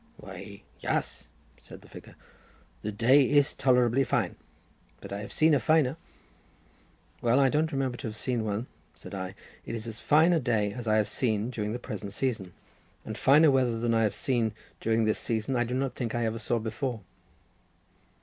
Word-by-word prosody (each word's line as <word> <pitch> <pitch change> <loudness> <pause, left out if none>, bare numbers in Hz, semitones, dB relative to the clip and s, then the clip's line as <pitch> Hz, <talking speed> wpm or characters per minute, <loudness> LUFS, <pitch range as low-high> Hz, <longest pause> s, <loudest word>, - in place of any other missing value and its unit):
"Why - - -10 0.2
yaas," - - -2 0.3
said - - -13
the - - -16
figure; - - -13 0.7
"the 105 - -3
day 120 +7 +5
is 145 0 +3
tolerably 125 0 +3
fine, - - 0 0.6
but - - -8
I 100 - -3
have 100 - -7
seen 155 0 +3
a 145 - +4
finer." 145 +1 +3 1.3
"Well, 120 +3 +3
I 135 -1 +5
don't 155 +4 +1
remember 135 -3 -1
to - - -5
have 105 - -6
seen 120 +1 -2
one," 105 +2 -2 0.3
said - - -11
I; 95 -1 -5 0.3
"it 115 - -5
is 110 0 -6
as 115 0 -6
fine 160 +4 +4
a 165 - +3
day 110 -6 0
as 120 -2 -7
I 110 - +3
have 105 - +2
seen 110 -1 -1
during 105 -3 -3
the 120 - -2
present 105 -4 -7
season, 110 -7 -2 0.5
and - - -5
finer 150 +3 +5
weather 125 -4 +2
than 115 0 0
I 115 - +3
have 105 -2 +1
seen 115 -4 0 0.3
during 115 0 +1
this 110 - +1
season 115 +3 -2
I 120 0 +2
do 125 +2 -3
not 135 -1 -1
think 120 -2 -3
I 120 -1 0
ever 115 +1 -2
saw 120 0 0
before." 115 +1 -3
120 Hz, 190 wpm, -28 LUFS, 110-135 Hz, 1.3 s, day